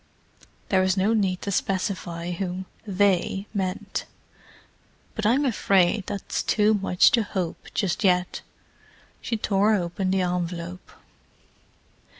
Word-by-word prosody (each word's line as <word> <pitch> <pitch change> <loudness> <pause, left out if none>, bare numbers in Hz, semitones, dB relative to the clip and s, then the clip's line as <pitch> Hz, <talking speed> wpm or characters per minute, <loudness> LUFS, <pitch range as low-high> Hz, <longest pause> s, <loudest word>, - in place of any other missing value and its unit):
There 190 -1 +4
was 190 +1 +1
no 200 +4 +3
need 190 -4 0
to 200 - -2
specify 185 -3 -2
whom 185 +1 -3 0.2
"they" 195 0 +1
meant. 190 -3 -3 1.1
"But 220 -2 -1
I'm 265 +6 +3
afraid 195 -4 +2
that's 200 -2 -3
too 215 0 +3
much 195 -3 +4
to 235 - +3
hope, 190 -5 -4
just 200 +1 0
yet." 180 -2 +2 0.8
She 230 - -2
tore 210 +1 +2
open 185 0 -2
the 190 0 +2
envelope. 175 0 -3
190 Hz, 120 wpm, -25 LUFS, 180-205 Hz, 1.1 s, There